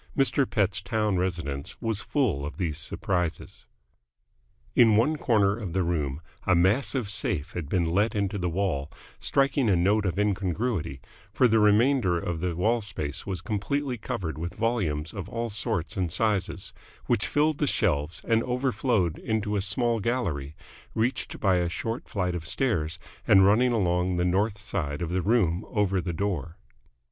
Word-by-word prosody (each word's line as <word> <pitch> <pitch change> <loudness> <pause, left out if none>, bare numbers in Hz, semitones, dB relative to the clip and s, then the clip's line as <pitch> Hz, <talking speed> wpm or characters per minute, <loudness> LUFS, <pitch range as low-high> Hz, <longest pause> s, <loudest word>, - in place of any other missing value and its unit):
Mr. 135 -1 +2
Pett's 105 -1 +1
town 105 0 0
residence 85 -6 -3
was 110 -3 -2
full 110 - 0
of 75 - -6
these 85 -6 -2
surprises. 90 -4 -3 1.1
In 115 -3 +6
one 125 +9 +3
corner 105 -8 +2
of 105 -7 -6
the 95 0 +1
room 75 -4 -2 0.3
a 95 - +5
massive 105 +7 +2
safe 75 -6 -2
had 85 -5 -5
been 90 -1 +1
let 100 +7 +1
into 100 0 -1
the 90 -1 -1
wall, 80 -5 -1 0.3
striking 135 -3 +2
a 95 - +4
note 100 +4 +2
of 90 - -2
incongruity, 100 - -1 0.3
for 125 - +4
the 110 -1 +3
remainder 105 -2 +4
of 85 -1 -3
the 90 0 -2
wall 115 +7 +1
space 85 -8 -5
was 95 -4 -3
completely 130 +5 -1
covered 85 -8 -4
with 85 +2 -5
volumes 95 -10 -1
of 100 -3 -6
all 115 0 -3
sorts 105 -3 -1
and 90 -5 -1
sizes, 105 +1 0 0.3
which 115 -4 +1
filled 150 0 +1
the 150 - +1
shelves 80 - 0
and 115 -1 +3
overflowed 125 - 0
into 110 -3 -1
a 100 - +1
small 115 +4 +2
gallery, 90 - -2 0.4
reached 120 +3 -1
by 95 -3 +3
a 90 -1 0
short 115 +7 -4
flight 90 -3 -1
of 80 -2 -5
stairs 85 -12 0 0.3
and 95 -1 +7
running 120 +5 +4
along 90 -4 +1
the 90 - +1
north 100 +4 +1
side 80 -7 -3
of 85 - -3
the 90 +1 0
room 95 -3 +2
over 100 -4 +1
the 85 - -3
door. 85 -2 -3
100 Hz, 165 wpm, -27 LUFS, 85-115 Hz, 1.1 s, and